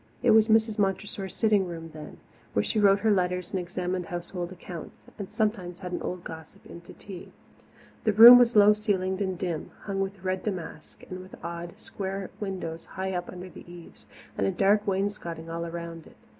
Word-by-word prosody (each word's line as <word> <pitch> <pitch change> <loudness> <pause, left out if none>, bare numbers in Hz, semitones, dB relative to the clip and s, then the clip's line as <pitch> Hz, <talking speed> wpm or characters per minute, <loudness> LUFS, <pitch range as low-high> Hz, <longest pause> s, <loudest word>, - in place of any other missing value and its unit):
It 245 - +5
was 220 0 +6
Mrs. 220 -1 +3
Montressor's 195 -1 -2
sitting 210 -4 +2
room 165 -2 -7
then, 155 -1 -10 0.4
where 100 - +2
she 215 - 0
wrote 200 -1 +5
her 220 0 +3
letters 180 -2 0
and 190 - -1
examined 180 0 -3
household 175 0 -5
accounts, 175 -2 -10
and 200 - -5
sometimes 195 -5 -1
had 180 -1 -7
an 175 - -3
old 180 -1 -4
gossip 160 -1 -10
in 170 - -11
to 170 - -13
tea. 190 -3 -10 0.7
The 215 - +4
room 235 +4 +11
was 240 -1 +3
low 210 0 +8
ceilinged 195 -3 -1
and 190 -2 -1
dim, 170 -4 -3
hung 195 -1 -2
with 195 -1 -4
red 185 0 -1
damask, 175 -6 -6
and 185 0 -7
with 185 +1 -12
odd, 170 0 -6
square 195 -1 -5
windows 185 -5 -5
high 190 0 -4
up 175 -1 -3
under 180 0 -8
the 175 - -12
eaves 175 -1 -13 0.3
and 100 - +2
a - - +1
dark 205 +2 +2
wainscoting 190 -4 -2
all 170 0 -3
around 170 -1 -7
it. - - -18
185 Hz, 195 wpm, -27 LUFS, 175-205 Hz, 0.7 s, room